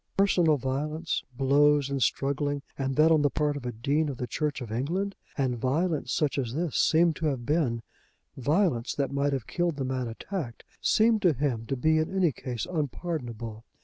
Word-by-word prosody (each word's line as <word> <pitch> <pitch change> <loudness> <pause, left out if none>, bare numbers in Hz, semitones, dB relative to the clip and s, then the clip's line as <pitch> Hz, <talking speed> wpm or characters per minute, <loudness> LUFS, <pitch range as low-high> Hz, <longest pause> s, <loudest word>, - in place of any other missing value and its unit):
Personal 175 -6 +4
violence; 150 +5 -2
blows 140 +1 +4
and 135 -1 -1
struggling, 140 +4 0
and 135 -1 -2
that 155 +3 +5
on 155 -2 +5
the 145 - +3
part 150 +1 0
of 130 -3 -5
a - - -2
Dean 140 +7 0
of 135 - -5
the 125 - -3
Church 150 +3 -2
of 120 -5 -7
England, 175 - -1 0.2
and 130 -4 0
violence 155 +6 0
such 145 -2 +1
as 125 -2 -3
this 165 -3 -2
seemed 165 0 +4
to 160 - -1
have 130 -5 -2
been, 130 -6 0 0.5
violence 140 - +1
that 140 -2 -1
might 140 +1 +1
have 135 -4 -2
killed 175 -2 -1
the 135 -2 -3
man 130 -1 -2
attacked, 120 - -5 0.2
seemed 220 0 +3
to 180 -5 +4
him 125 -4 -2
to 135 - -1
be 155 +5 +3
in 155 - -1
any 180 -5 +3
case 125 -4 -5
unpardonable. 125 -8 -4
145 Hz, 190 wpm, -28 LUFS, 130-160 Hz, 0.5 s, that